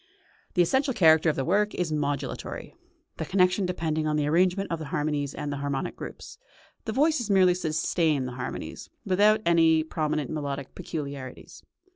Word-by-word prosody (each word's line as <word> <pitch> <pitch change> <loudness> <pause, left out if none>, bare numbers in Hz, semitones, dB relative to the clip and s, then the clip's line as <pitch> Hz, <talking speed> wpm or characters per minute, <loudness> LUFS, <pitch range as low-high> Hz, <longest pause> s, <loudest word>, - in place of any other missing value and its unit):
The 180 - +5
essential 265 +8 +1
character 160 -5 +5
of 155 - 0
the 135 - -2
work 205 +4 +1
is 175 -3 -1
modulatory, 145 -3 -3 0.4
the - - -3
connection 185 0 +2
depending 160 -3 -1
on 150 - +1
the 150 -1 +1
arrangement 180 +5 +2
of 165 - -1
the 155 - -5
harmonies 145 -1 -2
and 145 -1 -4
the - - -4
harmonic 140 -1 -3
groups; - - -9 0.5
the 220 - -2
voices 270 -2 +1
merely 185 -2 +5
sustain 160 -4 0
the 125 - -4
harmonies, 125 +1 -6 0.2
without 210 +3 +4
any 165 -2 +4
prominent 155 -3 -2
melodic 140 -3 -4
peculiarities. 140 -5 -7
160 Hz, 160 wpm, -27 LUFS, 145-185 Hz, 0.5 s, The